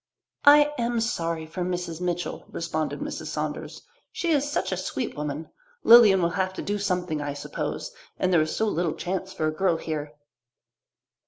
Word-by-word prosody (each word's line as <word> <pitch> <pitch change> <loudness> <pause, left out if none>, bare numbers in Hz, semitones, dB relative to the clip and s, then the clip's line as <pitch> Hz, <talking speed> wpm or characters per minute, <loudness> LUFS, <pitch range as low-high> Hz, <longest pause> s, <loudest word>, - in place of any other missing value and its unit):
"I 295 0 +8
am 235 0 0
sorry 165 -8 -1
for 160 +4 -6
Mrs. 175 -2 -3
Mitchell," 175 -1 -3
responded 160 -2 -3
Mrs. - - -5
Saunders. - - -4 0.3
"She 340 - -1
is 290 -1 +2
such - - -1
a - - +1
sweet 250 - -3
woman. 150 +1 -4 0.3
Lilian 215 -6 +8
will 170 - +2
have 190 0 -1
to - - -5
do 205 0 -2
something, 180 -6 -1
I 145 -1 -3
suppose, 145 - -4 0.3
and 185 0 +1
there 165 - +5
is 155 - -1
so 220 - +1
little 175 -6 0
chance 190 +1 -3
for 155 - -2
a 155 - +1
girl 175 0 +1
here." 150 -2 -5
180 Hz, 175 wpm, -26 LUFS, 160-205 Hz, 0.3 s, I